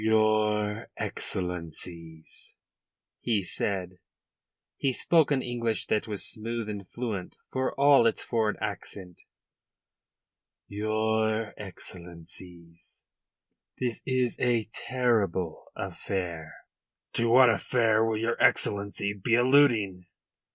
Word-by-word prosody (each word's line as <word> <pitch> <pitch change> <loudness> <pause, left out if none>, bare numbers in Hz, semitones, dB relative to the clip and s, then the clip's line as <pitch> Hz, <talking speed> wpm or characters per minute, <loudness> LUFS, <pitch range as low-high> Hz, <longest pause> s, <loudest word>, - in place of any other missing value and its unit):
"Your 110 -1 +2
Excellencies," 85 -2 -5 0.6
he 110 -5 0
said 90 0 -2 0.8
he 135 - 0
spoke 160 +4 +3
an 135 -3 +1
English 115 -2 -1
that 110 +2 0
was 105 -2 -3
smooth 115 0 -4
and 100 -3 -6
fluent 110 -7 -4 0.2
for 130 0 -1
all 140 -4 +6
its 115 - -1
foreign 110 -3 0
accent 90 -3 -6 1.5
"Your 110 +1 0
Excellencies, 85 -3 -9 0.7
this 125 -3 -2
is 130 -2 0
a 120 -3 +1
terrible 105 -10 0
affair." 85 -5 -4 0.6
"To 115 0 +1
what 125 0 +7
affair 110 0 +2
will 115 -1 +1
your 115 +2 -1
Excellency 100 0 +2
be 105 +4 +1
alluding?" 120 -8 +3
110 Hz, 95 wpm, -28 LUFS, 95-115 Hz, 1.5 s, what